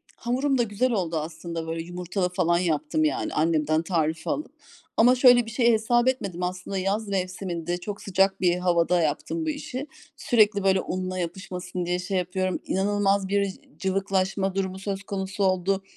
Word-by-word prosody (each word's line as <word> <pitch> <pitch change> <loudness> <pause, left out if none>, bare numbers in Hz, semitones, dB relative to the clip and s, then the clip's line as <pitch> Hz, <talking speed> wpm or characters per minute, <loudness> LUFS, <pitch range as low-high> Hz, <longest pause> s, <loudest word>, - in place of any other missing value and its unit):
Hamurum 265 +3 0
da 240 - +3
güzel 230 +4 0
oldu 175 -6 -1
aslında, 165 +1 -5
böyle 165 0 -3
yumurtalı 180 +1 -2
falan 170 -1 +2
yaptım 155 -2 0
yani, 150 -3 0
annemden 155 0 +2
tarifi 160 -2 -1
alıp. 305 - -2 0.5
Ama 245 +3 +6
şöyle 245 -2 +6
bir 225 - -7
şey 235 0 +3
hesap 240 +3 +2
etmedim 195 -9 -1
aslında 185 +2 -3
yaz 200 +3 -1
mevsiminde, 180 -3 -2
çok 200 +3 -6
sıcak 195 0 +1
bir 175 -1 +3
havada 175 -1 +2
yaptım 315 - -1
bu - - 0
işi. 285 -1 -5 0.3
Sürekli 210 -4 +3
böyle 190 -1 +3
unla 185 0 -3
yapışmasın 180 0 -4
diye 180 +1 0
şey 185 +1 -2
yapıyorum, 185 +1 -1
inanılmaz 200 0 +1
bir 200 -1 +1 0.2
cıvıklaşma 195 0 0
durumu 190 -1 -2
söz 195 0 -4
konusu 195 0 -3
oldu. 190 +1 +1
190 Hz, 160 wpm, -25 LUFS, 175-205 Hz, 0.5 s, Ama